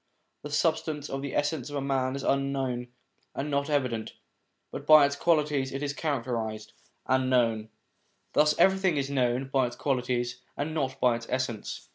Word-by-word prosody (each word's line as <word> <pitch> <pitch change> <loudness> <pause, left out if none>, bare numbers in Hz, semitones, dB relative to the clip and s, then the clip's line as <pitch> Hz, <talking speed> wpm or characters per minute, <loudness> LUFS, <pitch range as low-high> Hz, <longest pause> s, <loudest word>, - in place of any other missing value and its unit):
The 150 - -7
substance 150 -1 0
of 135 0 -3
the 140 -1 -5
essence 145 -2 -1
of 145 -1 -3
man 135 -1 0
is 140 - -5
unknown 135 -3 0 0.5
and 145 +2 -3
not 140 +1 0
evident, 125 -6 -1 0.6
but - - -7
by 155 -2 +9
its 140 0 -1
qualities 150 -4 +1
it 135 +2 -4
is 140 -1 -1
characterised 115 -8 -3 0.3
and 130 0 +2
known. 115 -4 +2 0.6
Thus 150 0 +4
everything 190 -4 +3
is 140 0 -1
known 130 0 0
by 135 -2 +2
its 120 - -8
qualities 125 -2 -1 0.2
and 150 +2 -2
not 135 -4 -2
by 120 -2 +3
its 115 - -10
essence. 130 -5 -3
135 Hz, 165 wpm, -28 LUFS, 125-145 Hz, 0.6 s, by